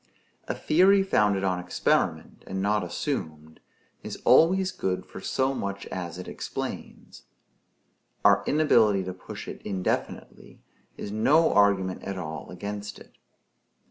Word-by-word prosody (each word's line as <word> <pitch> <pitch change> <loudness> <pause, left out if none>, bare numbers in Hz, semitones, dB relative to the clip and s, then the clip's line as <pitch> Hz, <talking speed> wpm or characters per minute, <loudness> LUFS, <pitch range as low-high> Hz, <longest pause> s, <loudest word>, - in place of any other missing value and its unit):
A - - -2
theory 195 +5 +4
founded 105 - +2
on 90 -2 0
experiment, 90 0 -1
and 95 - -4
not 105 +1 +1
assumed, 80 -2 -5 0.4
is - - -7
always 185 +3 +5
good 95 - -3
for - - -10
so 130 +1 0
much 100 -5 -4
as 90 -2 -5
it 90 - -8
explains. - - -7 1.0
Our - - +5
inability 115 -10 +3
to 95 0 -5
push 95 - -9
it - - -8
indefinitely 95 -3 -4 0.3
is 100 - -6
no 145 +10 +3
argument 100 -2 +2
at 100 -1 -5
all 80 -3 -6
against 105 +2 -6
it. - - -17
100 Hz, 130 wpm, -26 LUFS, 95-130 Hz, 1.0 s, always